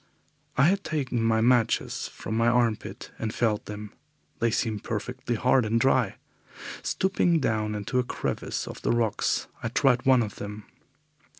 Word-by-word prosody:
I 130 - +5
had 195 +5 +3
taken 135 -6 -1
my 110 0 +2
matches 120 -1 +2
from 110 - -6
my 115 +1 +3
armpit 120 -2 0
and 110 - -2
felt 110 -3 0
them. 105 0 -7 0.5
They 115 - +2
seemed 110 -2 -1
perfectly 120 +3 -3
hard 125 +3 +3
and 110 +2 +1
dry. 125 -4 +2 0.7
Stooping 180 -3 +1
down 110 -5 0
into 105 +5 -1
a - - +2
crevice 120 - -3
of - - -8
the - - -1
rocks, 115 -3 +1 0.2
I - - -2
tried 125 +1 +2
one 130 -2 +6
of 105 - -6
them. 105 0 -7
115 Hz, 160 wpm, -27 LUFS, 110-125 Hz, 0.7 s, one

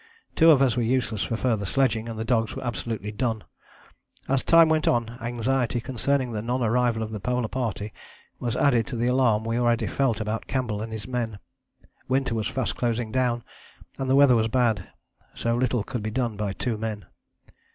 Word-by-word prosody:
Two 165 - +6
of 140 -4 +6
us 125 -4 +2
were 125 - +1
useless 115 -3 0
for 115 - -1
further 110 -4 0
sledging 115 +1 0
and 115 - -6
the 110 - -3
dogs 115 -2 +1
were - - -6
absolutely 105 -2 -3
done. 110 0 -2 0.8
As 135 -1 +1
time 165 -1 +6
went 155 -1 +1
on 120 0 +1
anxiety 120 +1 0
concerning 130 +1 -1
the 105 -2 -3
non 125 +3 -1
arrival 115 0 +1
of 110 - -5
the 105 - -4
Polar 125 +2 -1
Party 110 -4 -3 0.5
was 120 -1 -2
added 125 -5 +3
to 140 - -5
the 115 +1 0
alarm 125 -4 +3
we 115 +1 0
already 120 -1 +2
felt 130 -6 0
about 110 +1 -3
Campbell 115 -6 -2
and 110 +1 -5
his 110 0 -6
men; 120 -4 -3 0.7
winter 130 -1 +1
was 110 -2 -1
fast 130 - -2
closing 120 -2 -1
down, 120 -2 0 0.6
and 135 -1 -2
the 135 - +4
weather 140 -3 +6
was 110 -1 +2
bad. 115 -5 +1 0.5
So 115 0 0
little 120 -2 +1
could 120 +1 -4
be 110 - -3
done 115 -1 -1
by 100 -1 -2
two 115 +1 -3
men. 105 -4 -4
120 Hz, 195 wpm, -25 LUFS, 110-130 Hz, 0.8 s, Two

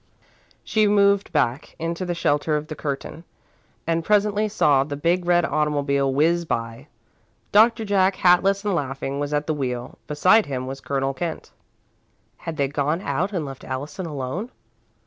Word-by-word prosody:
She 215 -1 +2
moved 200 -1 +3
back, 140 -2 -1
into 170 +2 -3
the 175 - -2
shelter 150 -1 +1
of 150 - -4
the 155 - -5
curtain, 145 +3 -5 0.6
and 165 0 0
presently 210 +2 +2
saw 145 -9 +3
the 145 +1 -5
big 175 +4 0
red 175 -1 +4
automobile 145 -3 0
whizz 165 +5 +2
by. 115 -7 -4 0.6
Doctor 225 +1 +4
Jack, 195 -1 +2
hatless 195 +3 +3
and 205 - +1
laughing, 135 -3 -3
was 145 0 -2
at 150 0 0
the 155 - -1
wheel. 125 -4 -4
Beside 185 +9 +4
him 130 -2 -3
was 135 +1 -6
Colonel 135 -1 -1
Kent. 160 +4 -5 0.9
Had 165 -1 -6
they 140 -2 +1
gone 145 +4 -1
out 175 +5 -1
and 175 -7 -2
left 135 -1 -9
Allison 145 +7 -5
alone? 150 - -4
155 Hz, 160 wpm, -23 LUFS, 140-185 Hz, 0.9 s, red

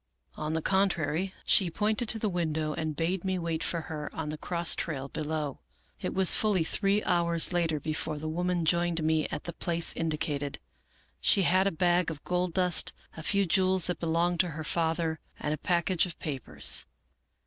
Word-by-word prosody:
On 155 +1 -3
the 160 -1 -1
contrary, 185 -2 +1
she 185 -3 +4
pointed 215 +6 -1
to 225 - 0
the 220 - -1
window, 160 -4 -1
and 160 -2 -3
bade 170 +3 -1
me 190 -1 0
wait 165 -2 -2
for 170 - 0
her 150 -1 -5
on 160 -2 -3
the 155 - -4
cross 170 -1 +1
trail 140 -4 -3
below. 150 -2 -3 0.2
" - - -34
It - - -2
was 190 -1 +5
fully 205 -6 +2
three 200 +5 +1
hours 170 -1 +2
later 165 -3 +1
before 155 0 -2
the 155 +1 -5
woman 175 +1 -1
joined 170 0 +1
me 155 -1 +2
at - - -5
the 170 - -5
place 170 0 +1
indicated. 150 -3 -2 0.6
She 195 - +4
had 185 +3 +3
a - - +1
bag 175 +1 +2
of 155 -3 -7
gold 180 -1 -1
dust, 180 -3 +2 0.2
a 160 - -7
few 200 +4 +2
jewels 185 0 +2
that 180 - -2
belonged 170 +1 +1
to 185 - +3
her 155 - -4
father, 160 0 0 0.2
and 150 - -1
a - - -3
package 175 0 +1
of 170 - -7
papers. 135 -6 0
170 Hz, 190 wpm, -29 LUFS, 155-180 Hz, 0.6 s, was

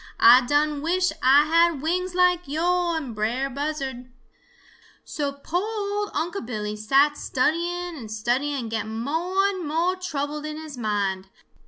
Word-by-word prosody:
Ah 245 +2 +8
done 295 0 +1
wish 360 +3 +1
Ah 275 +3 +6
had 335 -1 +3
wings 360 +4 -1
like 360 -2 +3
yo' 345 +3 0
and 280 -7 -4
Brer 240 +6 -1
Buzzard. 270 -3 -4 0.9
"So 290 -3 -3
po' 280 +5 -3
ol' 415 0 -3
Unc' 350 +5 -2
Billy 210 -3 -4
sat 275 +8 +3
studying 345 +5 -1
and 235 -7 -9
studying 245 +7 -1
and 235 -5 -4
getting 220 0 -3
mo' 325 +10 -2
and 375 -5 -3
mo' 335 +4 +1
troubled 300 -4 -4
in 305 0 -6
his 310 -2 -8
mind. 200 -5 -2
295 Hz, 150 wpm, -24 LUFS, 250-345 Hz, 0.9 s, Ah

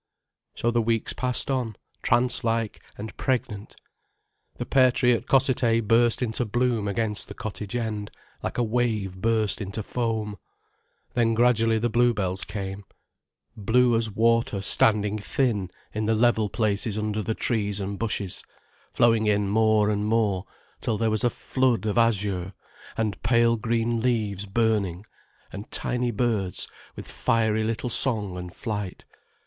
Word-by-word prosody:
So 120 - 0
the 120 0 +2
weeks 115 0 0
passed 125 +3 -1
on, 125 -5 -1 0.3
trance 120 +1 +2
like 115 -2 -1 0.2
and 110 +2 -7
pregnant. 110 -6 -2 0.8
The - - -4
pear 130 -2 +4
tree 125 0 +3
at 115 +1 -2
Cossethay 130 -3 +3
burst 115 +3 +3
into 115 +1 -1
bloom 120 -1 0
against 105 0 -1
the - - -9
cottage 105 +1 -6
end, 110 -3 -3 0.3
like - - -4
a 120 - +2
wave 110 -5 0
burst 110 -2 +1
into 100 +2 -4
foam. 110 -3 -2 0.7
Then 115 -2 +2
gradually 115 -1 +3
the 115 +1 0
bluebells 105 -6 +1
came, 100 -1 -5 0.7
blue 120 +3 +3
as 115 -1 +1
water 115 0 +2
standing 105 +1 +2
thin 105 -4 0 0.2
in 110 0 -2
the 110 - +3
level 110 -2 +3
places 105 0 0
under 105 0 -1
the 110 +2 -2
trees 105 -4 -1
and 100 0 -4
bushes, 105 -4 -3 0.5
flowing 115 -2 +3
in 105 -1 +2
more 110 0 +3
and 105 0 -1
more, 105 -4 +1 0.4
till 110 - -1
there 115 0 +1
was 110 -1 +1
a 120 - +4
flood 130 -2 0
of 110 +2 +1
azure, 100 -5 +1 0.4
and 110 -3 -1
pale 115 0 +3
green 115 +1 0
leaves 105 -5 -1
burning, 100 -3 0 0.5
and 100 +2 -7
tiny 125 0 -1
birds 105 -5 -1 0.3
with - - -8
fiery 110 -1 +1
little 115 +2 -2
song 105 -7 0
and 90 0 -7
flight. 105 -5 -5
110 Hz, 145 wpm, -25 LUFS, 105-120 Hz, 0.8 s, pear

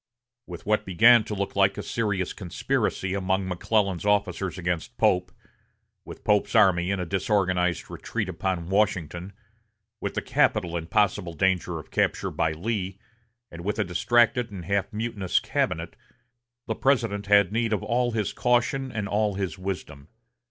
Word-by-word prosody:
With 85 -1 -9
what 105 +1 +1
began 115 +5 +6
to 105 - -4
look 100 0 -3
like 100 0 +3
a 105 - -4
serious 105 -5 -1
conspiracy 95 0 -2
among 95 0 0
McClellan's 95 0 0
officers 100 -2 0
against 90 -2 -3
Pope, 90 0 +2 0.7
with - - -10
Pope's 105 +1 +2
army 95 -5 +4
in 100 -1 0
a 90 - -2
disorganized 95 -2 0
retreat 110 -4 -4
upon 90 -1 -3
Washington, 95 -3 0 0.7
with - - -4
the - - 0
capital 85 -1 +1
in 80 -1 -3
possible 95 -4 +1
danger 90 0 +1
of 75 - -10
capture - - 0
by 80 -1 0
Lee, 95 +2 -3 0.5
and 85 0 -9
with 105 +3 -2
a 105 - +2
distracted 120 +6 +2
and 90 -4 -7
half 100 +2 0
mutinous 105 -4 -1
cabinet, - - -2 0.7
the 110 - -1
President 115 -6 0
had 100 -2 +5
need 115 0 0
of 105 - 0
all 120 +1 +1
his 110 -3 -2
caution 125 +2 +1
and 105 -4 -3
all 105 0 0
his 95 -2 -3
wisdom. 85 -7 -6
100 Hz, 155 wpm, -26 LUFS, 90-105 Hz, 0.7 s, began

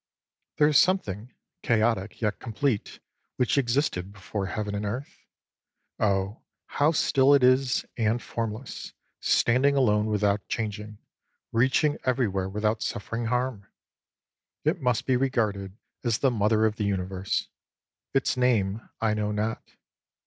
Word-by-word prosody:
There 150 - +5
is 150 -2 +5
something, 125 - 0 0.3
chaotic 110 -3 0
yet 105 -2 -1
complete, 115 -1 -2 0.4
which 125 - +1
existed 120 -8 0
before 100 0 -4
Heaven 105 +2 -3
and 100 0 -2
Earth. 120 +7 -6 0.7
Oh, 100 0 0 0.2
how 145 +2 +2
still 140 -3 +4
it 140 - +3
is, 130 +1 +3
and 115 +1 +1
formless, 115 +1 -5 0.3
standing 130 +4 +3
alone 105 -5 +3
without 105 -1 0
chang 110 -2 -2
ing, 105 0 -9 0.5
reaching 130 +5 +2
everywhere 105 -8 0
without 105 +2 -1
suffering 115 +3 -3
harm! 125 -3 -1 1.0
It - - +1
must 125 -3 +1
be 130 -2 +2
regarded 105 -7 -1 0.3
as 115 -3 +1
the 135 - +2
Mother 110 0 +2
of 110 -1 0
the 105 - -1
Universe. 95 -1 -2 0.6
Its 135 - +1
name 115 -5 +1
I 110 -1 +2
know 105 -1 -1
not. 105 +2 -2
110 Hz, 130 wpm, -27 LUFS, 105-125 Hz, 1.0 s, There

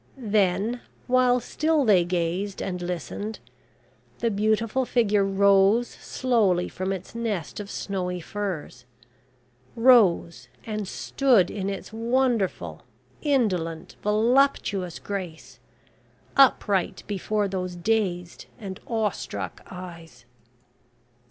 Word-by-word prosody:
Then, 210 0 +1 0.2
while 250 0 +3
still 305 +3 0
they 195 -6 +5
gazed 180 +3 -2
and 180 -2 -3
listened, 180 +5 -4 0.8
the 230 -1 0
beautiful 215 +4 +1
figure 215 -5 +2
rose 200 +3 +4
slowly 210 -9 0
from 185 +1 -3
its 190 -1 -5
nest 215 -9 -3
of 205 -1 -6
snowy 180 -3 -3
furs; 175 -10 -5 0.9
rose 225 -9 +4 0.2
and 215 -3 -3
stood 245 -2 +2
in 195 -1 -3
its 195 +2 -6
wonderful, 225 - 0 0.4
indolent, 185 - 0
voluptuous 210 -4 +2
grace, 185 -5 -6 0.8
upright 205 -8 +3
before 205 +1 -1
those 185 -2 -4
dazed 180 -3 -1
and 190 -3 -7
awe 220 -3 +1
struck 95 - -6
eyes. 165 -9 -10
200 Hz, 100 wpm, -25 LUFS, 180-230 Hz, 0.9 s, they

